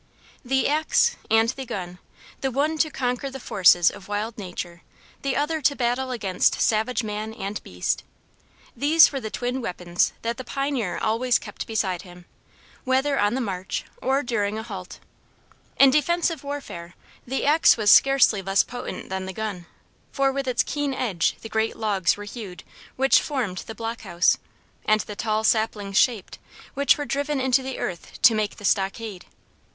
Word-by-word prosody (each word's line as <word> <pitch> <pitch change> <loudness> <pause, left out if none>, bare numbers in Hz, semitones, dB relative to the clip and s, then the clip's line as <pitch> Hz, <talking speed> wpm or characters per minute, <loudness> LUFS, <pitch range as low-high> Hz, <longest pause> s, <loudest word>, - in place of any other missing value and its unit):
The 265 +1 +1
axe 315 +10 +2
and 225 +1 +4
the 265 +2 -4
gun, 180 -7 -6 0.4
the 270 - -1
one 295 +5 0
to 310 - +3
conquer 255 -1 -2
the 270 0 -8
forces 175 -6 +4
of 200 -2 -12
wild 210 +2 -3
nature, 175 -3 -7 0.4
the 275 -1 -1
other 310 +2 0
to 285 - +3
battle 250 +1 0
against 200 -7 +1
savage 230 +2 +1
man 215 +1 -4
and 200 0 -5
beast 90 0 -2 0.7
these 305 +6 +6
were 275 - -3
the 220 - -4
twin 250 +4 -3
weapons 180 -4 -1
that 230 +1 -2
the 255 - -6
pioneer 265 -8 -2
always 230 +2 +1
kept - - -8
beside 190 -5 -1
him, 180 -2 -14 0.6
whether 270 +2 +1
on 205 +3 +2
the 265 - -1
march 190 -5 -4 0.2
or 270 +2 +1
during 215 -4 -1
a 220 - -4
halt. 195 -6 -8 0.8
In 275 -1 +8
defensive 330 +3 +1
warfare 230 -12 -7 0.3
the 265 +2 -2
axe 300 -1 +5
was 210 -2 +4
scarcely 270 -7 +5
less 195 +1 +2
potent 245 +1 -7
than 190 0 -4
the 190 - -5
gun, 200 -5 -5 0.4
for 275 -1 +2
with 275 0 -3
its 250 -1 +2
keen 290 -2 -2
edge 195 -11 0
the - - -7
great 220 0 -1
logs 200 -5 +1
were 205 - -7
hewed 205 -4 -8 0.3
which 270 +1 +4
formed 235 -11 -3
the 225 - -7
block 225 +2 -5
house, 175 -3 +2 0.4
and 215 0 +3
the 210 - -8
tall 215 0 -1
saplings 215 -3 +1
shaped, 225 -7 0 0.3
which 280 0 +3
were 290 - -3
driven 285 0 -1
into 260 0 +2
the 265 0 -5
earth 170 -3 -6
to 250 -3 +8
make 215 -1 -1
the 205 - -9
stockade. 195 0 -1
225 Hz, 170 wpm, -24 LUFS, 200-270 Hz, 0.8 s, In